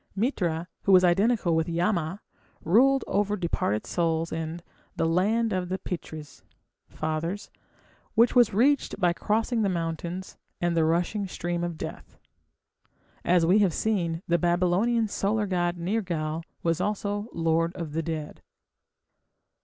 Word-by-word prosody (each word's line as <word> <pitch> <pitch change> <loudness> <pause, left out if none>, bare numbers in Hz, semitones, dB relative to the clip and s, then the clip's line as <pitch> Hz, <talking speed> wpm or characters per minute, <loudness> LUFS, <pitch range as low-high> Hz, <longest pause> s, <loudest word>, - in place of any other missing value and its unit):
Mitra, 175 - -1 0.2
who 195 - +3
was 185 -1 +7
identical 190 0 +3
with 160 +1 0
Yama, 175 +1 -1 0.4
ruled 260 +10 +4
over 205 +1 0
departed 165 - -1
souls 165 -1 0
in 160 +1 -4 0.3
the - - 0
"Land 210 +7 +2
of 180 -1 -2
the 190 - -1
Pitris" 155 -5 -7 0.5
(Fathers), 160 +5 -3 0.6
which 235 +2 +5
was 240 -3 +6
reached 255 +3 +2
by 175 -3 +3
crossing 225 +5 0
the 200 - +2
mountains 170 +1 -4 0.2
and 175 -1 0
the 165 -1 +3
rushing 175 +5 0
stream 175 -1 -3
of 170 -2 -3
death. - - -8 1.1
As 175 -1 +3
we 185 +5 +5
have 190 -6 +2
seen, 175 -6 -1
the 170 0 +2
Babylonian 185 +7 +2
solar 210 +1 0
god 175 -2 0
Nergal 170 -4 -2 0.2
was 165 -1 +1
also 205 0 -2
the - - -12
lord 165 +1 +1
of 165 -5 -5
the 165 - 0
dead. 160 -2 -5
175 Hz, 140 wpm, -27 LUFS, 165-205 Hz, 1.1 s, was